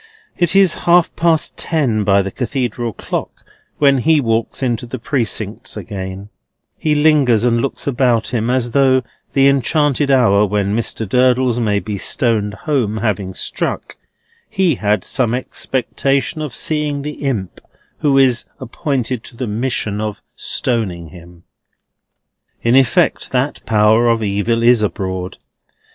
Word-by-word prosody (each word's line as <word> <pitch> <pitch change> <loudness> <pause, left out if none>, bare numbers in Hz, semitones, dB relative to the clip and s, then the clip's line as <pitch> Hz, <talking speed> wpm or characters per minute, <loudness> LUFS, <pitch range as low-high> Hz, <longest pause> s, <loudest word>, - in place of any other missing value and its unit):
It 175 +1 +1
is 195 -4 +5 0.2
half 175 -1 +4
past 165 -2 +1
ten 130 -10 0
by 100 -1 +3
the 95 - -5
Cathedral 120 -1 -3
clock - - -6 0.3
when 140 -2 +4
he 155 +4 +3
walks 115 0 -1
out - - +2
into 120 -1 -2
the 130 - -5
Precincts 120 -2 -3
again; 95 0 -7 0.5
he 155 -1 0
lingers 145 -7 +3
and 120 -1 +2
looks 135 - -3
about 125 -4 +1
him, 115 -1 -1
as 125 -1 0
though, 130 -1 +3 0.3
the 135 0 +4
enchanted 140 +1 +2
hour 115 -7 +4
when 100 0 0
Mr. 115 -1 -2
Durdles 125 +1 +2
may 105 -3 +1
be 105 -1 -5
stoned 105 -3 0
home 125 -9 0
having 100 -4 -2
struck, - - -4 0.5
he 185 -4 +2
had 105 -5 0
some 120 -3 0
expectation 135 +4 -2
of 145 -6 -5
seeing 150 0 -1
the 150 +1 -6
Imp 110 -10 -3 0.4
who 140 -2 +2
is 125 -4 +3
appointed 130 -2 -3
to 120 - -13
the 125 - -3
mission 110 -2 -2
of 105 -1 -4 0.2
stoning 95 -10 -2
him. 85 +1 -15 1.2
In 115 +2 +3
effect, 145 +6 +2
that 130 +3 -1
Power 110 +2 +4
of 115 -1 +1
Evil 105 +3 0
is 120 -1 +5
abroad. 95 -3 -3
120 Hz, 145 wpm, -17 LUFS, 105-135 Hz, 1.2 s, is